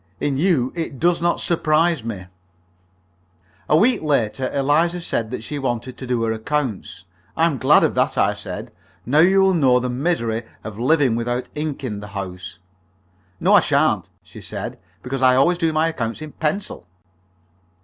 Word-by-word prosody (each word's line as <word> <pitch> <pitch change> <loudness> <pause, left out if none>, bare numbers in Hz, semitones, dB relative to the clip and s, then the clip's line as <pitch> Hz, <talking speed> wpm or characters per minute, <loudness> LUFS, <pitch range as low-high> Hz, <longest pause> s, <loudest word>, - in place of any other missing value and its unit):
"In 145 -2 -1
you 145 -5 +1
it 160 -6 -5
does 170 0 +2
not 170 0 +1
surprise 165 -3 +1
me." 105 -5 -6 1.4
A 155 - +5
week 240 +9 +3
later 135 -4 0
Eliza 150 +6 +1
said 115 -9 -2
that 120 -2 -5
she 145 +4 -5
wanted 125 -1 -3
to 130 - -7
do 120 -2 0
her 115 - 0
accounts. 110 -5 -3 0.3
"I 165 - +4
am 150 -6 0
glad - - +5
of - - +2
that," - - 0
I - - +3
said. - - -7 0.3
"Now 145 +6 +2
you 190 +4 +5
will 190 0 +4
know 130 -7 +4
the 125 0 -3
misery 125 -5 -1 0.2
of 110 -1 -8
living 135 -1 +3
without 120 +2 -2
ink 150 -2 -4
in 105 -6 -4
the 105 - -8
house." 90 -3 -7 0.8
"No, - - +3
I - - +8
sha'n't," - - +1
she - - -13
said, - - -6 0.2
"because 135 +1 -4
I 130 -1 +5
always 170 +7 +3
do 165 -1 +1
my 155 +1 +1
accounts 115 -2 -4
in 155 - -8
pencil." 155 - -3
135 Hz, 175 wpm, -21 LUFS, 115-160 Hz, 1.4 s, I